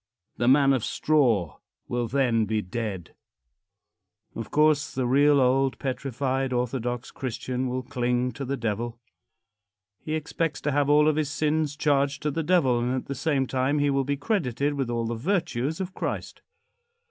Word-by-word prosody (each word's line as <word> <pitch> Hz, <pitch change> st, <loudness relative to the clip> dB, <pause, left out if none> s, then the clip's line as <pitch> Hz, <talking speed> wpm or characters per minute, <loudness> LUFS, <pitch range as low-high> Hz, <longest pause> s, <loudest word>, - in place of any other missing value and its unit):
The 120 Hz, -, 0 dB
man 135 Hz, +1 st, +5 dB
of 130 Hz, -5 st, 0 dB
straw 120 Hz, -, +1 dB, 0.3 s
will 120 Hz, -1 st, -1 dB
then 120 Hz, -3 st, +2 dB
be 105 Hz, 0 st, -1 dB
dead. 95 Hz, -2 st, -5 dB, 1.2 s
Of -, -, -6 dB
course, 150 Hz, 0 st, +2 dB
the 130 Hz, -1 st, 0 dB
real 140 Hz, +3 st, +4 dB
old 135 Hz, +1 st, +2 dB
petrified, 135 Hz, 0 st, -2 dB
orthodox 125 Hz, 0 st, -2 dB
Christian 130 Hz, 0 st, -3 dB
will 130 Hz, +1 st, -3 dB
cling 125 Hz, -1 st, -1 dB
to 140 Hz, -, -7 dB
the 135 Hz, +1 st, -2 dB
Devil. 115 Hz, +1 st, -3 dB, 1.0 s
He 155 Hz, -, -3 dB
expects 160 Hz, 0 st, -2 dB
to 150 Hz, -, 0 dB
have 145 Hz, 0 st, +1 dB
all 150 Hz, +1 st, +5 dB
of 155 Hz, -1 st, +2 dB
his 155 Hz, -2 st, 0 dB
sins 150 Hz, 0 st, 0 dB
charged 140 Hz, -2 st, +1 dB
to 150 Hz, -, 0 dB
the 165 Hz, -, -2 dB
Devil, 155 Hz, -8 st, +3 dB
and 125 Hz, +2 st, 0 dB
at 130 Hz, -, -3 dB
the 140 Hz, -, -4 dB
same 140 Hz, 0 st, 0 dB
time 130 Hz, +3 st, 0 dB
he 145 Hz, -1 st, +2 dB
will 135 Hz, 0 st, +1 dB
be 140 Hz, +1 st, -1 dB
credited 145 Hz, -, 0 dB
with 135 Hz, -4 st, -2 dB
all 115 Hz, -1 st, -1 dB
the 115 Hz, -, -2 dB
virtues 160 Hz, -, -1 dB
of 190 Hz, -1 st, -4 dB
Christ. -, -, -4 dB
135 Hz, 170 wpm, -26 LUFS, 125-145 Hz, 1.2 s, man